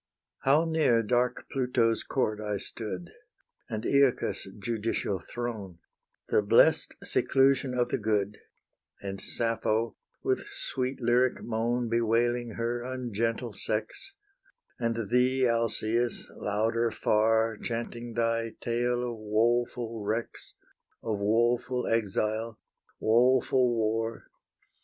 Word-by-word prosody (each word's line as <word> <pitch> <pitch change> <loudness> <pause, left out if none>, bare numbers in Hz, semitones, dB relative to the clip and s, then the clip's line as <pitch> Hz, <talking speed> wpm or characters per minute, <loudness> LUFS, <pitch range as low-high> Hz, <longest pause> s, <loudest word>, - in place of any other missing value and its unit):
How 145 +5 +3
near 155 -8 +3
dark 125 +2 0
Pluto's 125 -3 +1
court 110 -6 -1
I 105 -1 -2
stood, 95 -4 -6 0.6
And 110 0 -3
AEacus' 140 -7 +2
judicial 105 -2 -2
throne, 110 -7 -6 0.5
The - - +4
blest 100 - +4
seclusion 135 -1 +2
of 120 - +1
the - - -1
good, 105 -1 0 0.6
And 100 -1 -6
Sappho, 115 -1 -1 0.3
with - - 0
sweet 130 +1 -3
lyric 120 +1 +2
moan 120 +1 -1
Bewailing 115 +1 +1
her 120 +1 -2
ungentle 120 -2 -2
sex, 110 - -3 0.6
And 115 -3 -1
thee, 125 +1 +3
Alcaeus, 115 0 0
louder 115 +3 0
far 110 0 +2
Chanting 120 0 -5
thy 115 -1 0
tale 120 +1 0
of 120 -2 -5
woful 115 +1 0
wrecks, 110 +3 -4 0.5
Of 110 -3 -2
woful 120 +4 +1
exile, 110 0 -1 0.4
woful 125 +2 +4
war! 115 +1 -2
115 Hz, 105 wpm, -29 LUFS, 110-120 Hz, 0.6 s, The